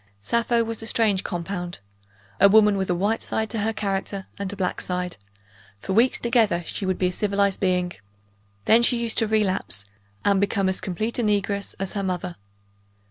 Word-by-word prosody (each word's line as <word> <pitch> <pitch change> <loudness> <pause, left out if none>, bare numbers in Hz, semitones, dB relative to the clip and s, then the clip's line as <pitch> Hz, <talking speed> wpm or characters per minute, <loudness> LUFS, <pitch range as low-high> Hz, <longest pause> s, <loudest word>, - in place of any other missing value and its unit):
Sappho 235 - +1
was 225 -1 -4
a 225 - -5
strange 215 -5 +2
compound. 175 0 -4 0.6
A 200 - +7
woman 210 0 +6
with 190 -1 -2
a 180 - +2
white 205 +5 0
side 220 -1 -2
to 225 - -2
her 220 +2 0
character, 195 -2 -3
and 200 -1 -3
a - - -6
black 185 -2 -2
side. 180 -1 -3 0.6
For 155 - -4
weeks 235 +5 +3
together, 225 -7 +2
she 195 - -4
would 185 - 0
be 185 - +1
a - - -6
civilized 200 -1 +1
being. 180 -2 +1 0.7
Then 230 +2 +6
she 240 +1 +4
used 235 -1 +1
to 225 - +1
relapse, 190 - 0 0.4
and 200 -1 +3
become 200 -1 +1
as 190 - 0
complete 215 +7 -3
a - - +3
negress 200 -1 0
as 195 -1 -2
her 200 - -2
mother. 180 -2 -3
200 Hz, 190 wpm, -24 LUFS, 185-220 Hz, 0.7 s, A